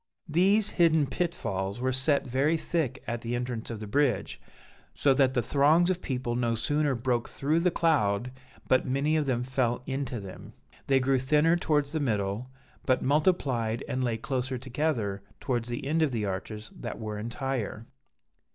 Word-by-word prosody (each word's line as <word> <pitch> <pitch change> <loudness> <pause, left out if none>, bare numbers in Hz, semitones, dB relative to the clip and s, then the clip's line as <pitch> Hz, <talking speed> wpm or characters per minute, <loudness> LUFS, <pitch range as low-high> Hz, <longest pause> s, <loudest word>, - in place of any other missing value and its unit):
"These 195 +6 +3
hidden 160 -4 +4
pitfalls 110 - -2
were 130 +1 0
set 140 +3 +1
very 135 +6 +1
thick 160 -5 -2
at 120 0 -3
the 120 +1 -2
entrance 120 -2 -4
of 115 -2 -5
the 110 - -6
bridge, 135 +3 0 0.5
so 140 - +4
that 130 -1 +3
the 125 - +2
throngs 155 +8 +4
of 180 -1 -3
people 125 -3 -2
no 120 -1 +1
sooner 145 +3 +1
broke 120 0 -1
through 150 +4 0
the 180 +2 +3
cloud, 125 - +1 0.4
but 130 - +4
many 140 +4 +1
of 150 -2 +1
them 125 -2 0
fell 125 -1 0
into 135 -3 -3
them. 95 -2 -10 0.3
They 135 -1 +4
grew 130 0 +2
thinner 150 +5 +3
towards 150 -4 +1
the 160 - -1
middle, 105 -2 -1 0.3
but 130 - +1
multiplied 135 -7 +1
and 130 0 -1
lay 120 -2 0
closer 130 +2 -2
together 120 -6 -2 0.2
towards 120 -3 -2
the 120 +2 -4
end 160 +4 +1
of 155 -3 +2
the 110 -4 -1
arches 105 +3 -5
that - - -5
were 105 -2 -5
entire. 115 -1 -3
130 Hz, 170 wpm, -28 LUFS, 115-150 Hz, 0.5 s, hidden